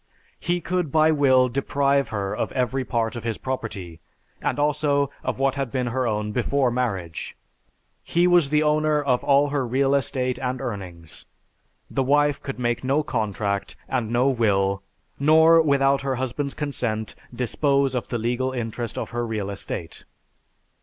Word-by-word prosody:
He 175 +1 -1
could 180 -4 -1
by 155 +1 +4
will 130 -4 +4
deprive 140 +2 +1
her 100 -2 -2
of - - -2
every 130 +1 0
part 115 -3 -1
of 120 - -6
his 115 -2 -2
property, 100 -10 -5 0.4
and - - -1
also 145 -1 +1
of - - -2
what 135 0 +2
had 135 -3 -3
been 130 -2 -1
her 130 -1 0
own 105 -1 -1
before 125 +3 +1
marriage. 100 -10 -3 0.6
He 175 +1 +1
was 175 -5 +4
the 150 +1 +3
owner 155 0 +2
of 130 -4 +1
all 140 +1 +4
her 140 -2 0
real 135 +3 +1
estate 130 -2 0
and 130 0 -2
earnings. 90 -8 -6 0.6
The - - -1
wife 145 +2 +2
could 135 - -5
make 120 -1 -1
no 140 +4 +1
contract 105 -7 -2
and 120 -4 -1
no 120 +3 +2
will, 100 -6 +1 0.4
nor, 160 +3 +6
without 140 -2 +3
her 135 -1 -1
husband's 130 +3 -3
consent, 120 -7 -3 0.2
dispose 135 +2 +1
of 125 - -2
the 120 - -2
legal 125 +3 -1
interest 120 -1 -4
of - - -4
her 120 0 -2
real 110 -4 -3
estate.... 90 -4 -6
130 Hz, 160 wpm, -24 LUFS, 115-140 Hz, 0.6 s, nor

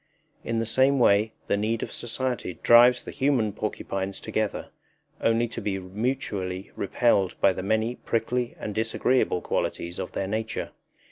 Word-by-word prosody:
In 115 - -2
the 115 - 0
same 130 +5 +3
way 110 -3 +4
the - - +1
need 110 +2 -1
of - - -5
society 120 -5 -3
drives 120 +1 +7
the - - -7
human 130 -7 +1
porcupines 95 -2 -3
together, 110 -2 -2 0.5
only 115 +1 +2
to 115 - -6
be 100 -2 -1
mutually 95 -2 -3
repelled 100 -3 +1
by 95 - +4
the 95 - -4
many 110 +5 0
prickly 120 +2 -1
and 105 - -4
disagreeable 110 -2 +1
qualities 85 +1 -2
of - - -5
their 95 - -2
nature. 110 +2 -3
110 Hz, 150 wpm, -26 LUFS, 100-120 Hz, 0.5 s, drives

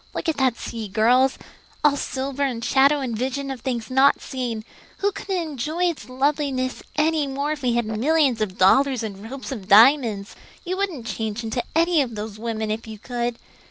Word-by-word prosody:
Look - - -3
at 320 - 0
that 260 -3 +2
sea, 225 -2 -5
girls 245 +6 +3 0.5
all 295 -1 +5
silver 275 0 -4
and 245 -5 -1
shadow 280 +2 +4
and 245 -4 -3
vision 265 +4 -2
of 260 -3 -6
things 240 -2 -3
not 265 +2 +5
seen. 240 -5 -4 0.4
We 405 - +3
couldn't 390 -1 -4
enjoy 315 +1 -2
its 255 -8 -11
loveliness 265 -1 -1
any 305 -1 +2
more 280 +2 -2
if 305 -2 -4
we 250 -2 +1
had 235 -1 +1
millions 255 +3 +2
of 195 -3 -2
dollars 255 +6 +4
and 210 0 -7
ropes 275 +1 -7
of 210 -8 -6
diamonds. 220 -2 +5 0.3
You 365 +1 -2
wouldn't 360 -12 -2
change 225 -1 -3
into 225 +2 -2
any 335 -1 +4
of 240 -5 -3
those 210 0 -6
women 220 -1 -3
if 225 +1 -4
you 220 -1 -8
could. 240 +1 -3
255 Hz, 190 wpm, -23 LUFS, 225-285 Hz, 0.5 s, all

